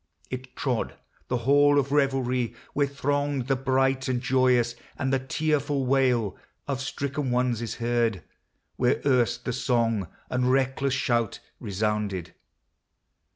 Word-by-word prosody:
It 130 0 -6
trod 125 -5 -1 0.3
the 125 - 0
hall 145 +1 +5
of 140 -1 +1
revelry, 130 -4 +1 0.2
where 145 -1 +2
thronged 140 -1 -1
The 135 +1 +1
bright 135 0 +1
and 125 -1 0
joyous, 125 -2 +3 0.2
and 135 -1 -1
the 135 - +3
tearful 145 0 0
wail 125 -5 +2 0.3
Of 135 -2 -2
stricken 140 0 -3
ones 125 -2 +1
is 115 -3 -4
heard 115 -5 0 0.5
where 125 -1 +2
erst 125 -4 +2
the 125 - -1
song 115 -6 +1 0.2
And 125 0 +1
reckless 135 0 +1
shout 120 -4 0 0.2
resounded. 105 -3 -2
130 Hz, 130 wpm, -26 LUFS, 120-135 Hz, 0.5 s, hall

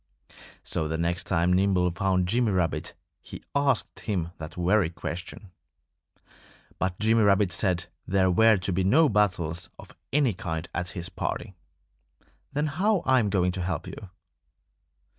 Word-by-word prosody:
So 80 -2 -1
the 80 +1 -2
next 85 +2 -1
time 85 +2 +2
Nimble 90 -1 +2
found 90 0 0
Jimmy 115 +2 +1
Rabbit 90 -3 -1 0.3
he - - -10
asked 140 -4 0
him 90 -6 -2
that 80 -1 -8
very 90 0 +2
question. 85 +3 -7 1.3
But 95 -1 -1
Jimmy 110 +1 +3
Rabbit 100 -2 +3
said 90 -2 0 0.2
there 95 0 +2
were 110 +3 +5
to 95 0 -2
be 95 +2 +1
no 145 - +4
battles 90 -4 0
of - - -14 0.2
any 135 -5 +2
kind 80 -2 -4
at 90 +1 -3
his 85 0 -5
party. - - -4 1.0
"Then 145 +2 0
how 185 +6 +1
am 130 -4 +4
I - - -1
going 90 -2 +1
to 90 0 -4
help 90 +1 -3
you?" 100 - -9
95 Hz, 150 wpm, -26 LUFS, 90-110 Hz, 1.3 s, were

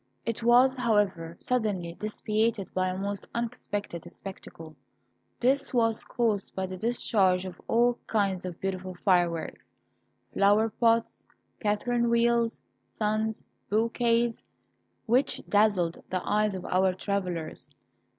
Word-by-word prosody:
It 230 0 -2
was, 245 +3 +5
however, 200 -8 0
suddenly 205 -9 -1
dissipated 215 +1 -1
by 185 0 +1
a 185 - -3
most 200 +1 -4
unexpected 205 -7 -4
spectacle. 165 -5 -10 0.6
This 270 +2 +1
was 225 -2 +2
caused 220 -5 -1
by 190 - -1
the 185 0 -6
discharge 190 -3 +2
of 180 -1 -8
all 240 +1 +3
kinds 195 -4 0
of 180 -2 -6
beautiful 185 -1 -4
fireworks 175 -4 +1 0.7
flowerpots, 225 +3 +2 0.3
catherine 235 +3 0
wheels, 235 0 +2 0.4
suns, 215 0 -1 0.2
bouquets, 230 +2 +2 0.7
which 250 +4 +2
dazzled 205 -5 +2
the 185 -1 -3
eyes 210 -1 +2
of 185 - -6
our 185 0 +2
travellers. 180 -5 -3
210 Hz, 110 wpm, -28 LUFS, 185-230 Hz, 0.7 s, was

